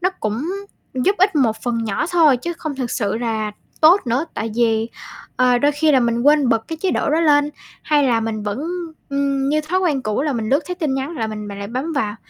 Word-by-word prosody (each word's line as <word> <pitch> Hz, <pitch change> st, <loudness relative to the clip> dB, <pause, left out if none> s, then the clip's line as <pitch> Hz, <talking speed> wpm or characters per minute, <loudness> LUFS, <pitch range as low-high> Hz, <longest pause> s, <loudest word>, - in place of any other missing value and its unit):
nó 365 Hz, +1 st, +2 dB
cũng 220 Hz, +7 st, -2 dB, 0.5 s
giúp 260 Hz, +11 st, +1 dB
ích 380 Hz, -2 st, +3 dB
một 235 Hz, -6 st, +2 dB
phần 235 Hz, -2 st, -1 dB
nhỏ 210 Hz, +4 st, -1 dB
thôi 320 Hz, -6 st, +5 dB
chứ 340 Hz, +8 st, -4 dB
không 315 Hz, -3 st, -5 dB
thực 250 Hz, -3 st, -3 dB
sự 205 Hz, -3 st, -1 dB
là 220 Hz, -3 st, -2 dB, 0.3 s
tốt 340 Hz, +6 st, +7 dB
nữa. 245 Hz, +6 st, +1 dB
Tại 225 Hz, -, -3 dB
vì, 225 Hz, -1 st, +2 dB, 0.5 s
ờ, 250 Hz, -1 st, +4 dB
đôi 290 Hz, +4 st, +2 dB
khi 305 Hz, +1 st, +2 dB
là 265 Hz, -, +5 dB
mình 235 Hz, -1 st, +1 dB
quên 290 Hz, -1 st, +4 dB
bật 225 Hz, -2 st, 0 dB
cái 325 Hz, -, -5 dB
chế 380 Hz, -, +2 dB
độ -, -, 0 dB
đó 315 Hz, +2 st, +2 dB
lên, 295 Hz, -2 st, +3 dB, 0.3 s
hay 295 Hz, -2 st, +2 dB
là 230 Hz, -2 st, +2 dB
mình 220 Hz, -1 st, -3 dB
vẫn, 205 Hz, +1 st, -3 dB, 0.5 s
ưm, 275 Hz, -1 st, 0 dB
như 305 Hz, +2 st, +2 dB
thói 335 Hz, +5 st, -1 dB
quen 305 Hz, -8 st, 0 dB
cũ 215 Hz, +3 st, -1 dB
là 300 Hz, -1 st, 0 dB
mình 225 Hz, -3 st, -2 dB
lướt 275 Hz, +5 st, +3 dB
thấy 360 Hz, -, -3 dB
tin 310 Hz, -7 st, -1 dB
nhắn 270 Hz, +5 st, -3 dB
là 225 Hz, -4 st, -1 dB
mình 210 Hz, -1 st, -6 dB
mình 200 Hz, 0 st, -7 dB
lại 200 Hz, 0 st, -5 dB
bấm 260 Hz, +8 st, -3 dB
vào 220 Hz, -8 st, -1 dB
265 Hz, 245 wpm, -20 LUFS, 225-305 Hz, 0.5 s, tốt